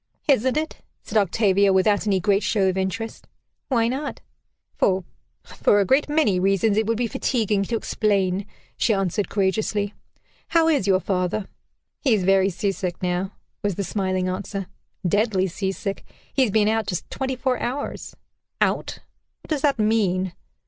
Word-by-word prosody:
"Isn't 260 -1 +3
it?" 315 +1 -2 0.3
said - - -8
Octavia, 200 0 +3
without 205 +2 +2
any 195 -2 +3
great 195 +2 +2
show 200 -4 +1
of 185 - +1
interest. 190 +4 -3 0.4
"Why 230 -4 +2
not?" 275 +4 -3 0.6
"For 190 -1 +2 0.4
for 205 - +2
a 200 - +3
great 275 +9 +2
many 295 -12 +2
reasons 195 +2 +2
it 215 0 +1
would 230 0 +1
be 245 - 0
fatiguing 220 -3 0
to 235 - -2
explain," 200 -4 0 0.3
she 225 - +2
answered 195 +1 -1
courageously. 205 +1 0 0.5
"How 330 -1 +3
is 285 -11 +2
your 190 -1 +3
father?" 185 +2 -1 0.5
"He 260 -6 +3
is 195 - -1
very 195 +1 +4
sea 195 +2 -1
sick 180 -2 -3
now," 180 +2 -1 0.3
was 205 -3 -1
the 200 - -2
smiling 185 -2 -1
answer, 195 +1 -3 0.4
"deadly 205 0 +2
sea 190 +1 -2
sick. 195 0 -4 0.3
He 275 - +2
has 255 - +4
been 210 +1 +3
out 220 0 +1
just 180 - -3
twenty 265 -1 -2
four 255 0 0
hours." 265 +4 -4 0.4
"Out? - - 0 0.4
What - - -17
does 305 -3 0
that 280 -2 +2
mean?" 195 -5 +1
205 Hz, 165 wpm, -23 LUFS, 190-225 Hz, 0.6 s, very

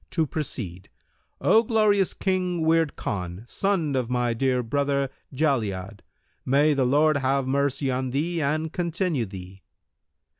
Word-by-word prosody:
To 165 -2 +1
proceed: 115 - -5 0.5
O 225 - +5
Glorious 215 -4 +2
King 180 -3 -1
Wird 160 -2 +2
Khan, 90 +1 -4
son 170 -7 0
of 125 -2 -1
my 125 -1 +1
dear 125 +1 +1
brother, 140 +2 0 0.2
Jali'ad, 110 - -1 0.4
may 145 +3 +3
the 135 -3 +1
Lord 150 +3 +3
have 135 0 +1
mercy 140 0 0
on 130 0 -1
thee 160 +6 -1
and 155 +2 -1
continue 170 - -1
thee! 95 0 -10
140 Hz, 135 wpm, -25 LUFS, 125-160 Hz, 0.5 s, O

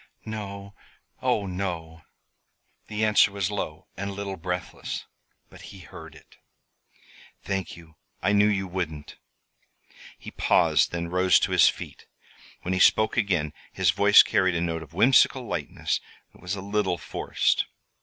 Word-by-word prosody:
"No 100 -2 -7 0.5
oh, 100 - +1
no!" 85 -4 -5 0.9
The 110 0 -1
answer 105 -2 +4
was 100 -1 -2
low 80 -7 -5
and 100 +1 -4
a - - -5
little 100 -1 -5
breathless; 90 +1 -5 0.4
but - - -15
he 95 -2 -12
heard - - -12
it. - - -19 1.1
"Thank 95 -3 -4
you. 80 -2 -17 0.2
I 100 +3 +1
knew 105 0 +5
you 100 -2 0
wouldn't." 80 -5 -5 1.0
He - - -10
paused, - - +2
then 85 0 -4
rose 90 0 +4
to - - 0
his - - +6
feet. - - -9 0.6
When 90 - -2
he 95 - 0
spoke 110 +3 +4
again 90 -10 0 0.2
his 95 -4 +2
voice 100 +5 +7
carried 95 -2 +1
a 85 - 0
note 80 -1 -2
of 80 0 -13
whimsical 125 +7 +4
lightness - - -2 0.3
that - - -20
was 90 +3 -3
a 95 - -6
little 100 -2 -1
forced. 75 - 0
95 Hz, 150 wpm, -25 LUFS, 85-100 Hz, 1.1 s, voice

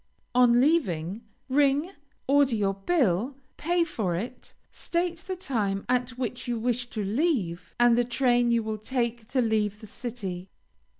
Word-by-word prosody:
On 245 -1 +5
leaving, 210 - +1 0.3
ring, 285 +5 +2 0.4
order 275 -3 +4
your 200 -2 +1
bill, 225 - +1 0.2
pay 345 +2 +1
it, 220 - -4 0.2
state 345 0 -2
the 375 +2 -5
time 215 - -2
at 250 0 0
which 250 0 -4
you 240 -1 -1
wish 240 +1 -1
to 215 -3 -3
leave, 200 - -1
and 240 -1 +6
the 245 - +3
train 245 -1 +2
you 235 -1 +2
will 215 0 -3
take 235 -1 -2
to 255 0 +1
leave 210 -2 0
the 215 - -11
city. 205 -5 -6
240 Hz, 145 wpm, -27 LUFS, 210-270 Hz, 0.4 s, and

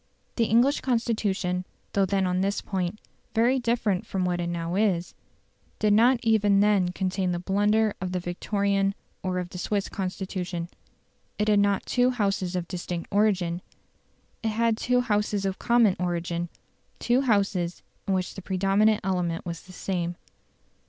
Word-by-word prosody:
The 230 - +2
English 240 +6 +3
Constitution, 210 -7 0 0.3
though 195 -1 +2
then 195 0 +1
on 180 0 0
this 200 +1 0
point 190 +1 -3 0.4
very 245 +4 +3
different 225 -5 0
from 195 -4 -2
what 175 -1 0
it 170 - -2
now 170 0 -3
is, 190 -4 +1 0.6
did 210 -1 +3
not 235 +4 +5
even 210 -3 +4
then 200 -3 +3
contain 185 0 -1
the 175 - -1
blunder 205 +4 +2
of 185 -1 -3
the 180 - -1
Victorian 195 +2 0 0.3
or 185 -1 -2
of 180 -1 -3
the 180 - -7
Swiss 200 +1 -1
Constitution. 185 -2 -4 0.7
It 210 +1 +1
had 205 -1 +5
not 200 -1 +2
two 250 0 +2
Houses 195 -6 -1
of 175 -1 -2
distinct 175 -2 -5
origin; 190 -4 +2 0.8
it 225 - 0
had 230 +1 +2
two 250 +2 +1
Houses 210 -3 0
of 195 -1 -2
common 235 -5 +4
origin 175 -1 -2 0.5
two 245 +2 +2
Houses 200 -8 0 0.2
in 195 - +2
which 185 -1 -2
the 195 - -8
predominant 195 +3 +2
element 180 -3 -1
was 170 -2 -5
the 185 - -15
same. 180 -2 -3
195 Hz, 160 wpm, -26 LUFS, 180-215 Hz, 0.8 s, not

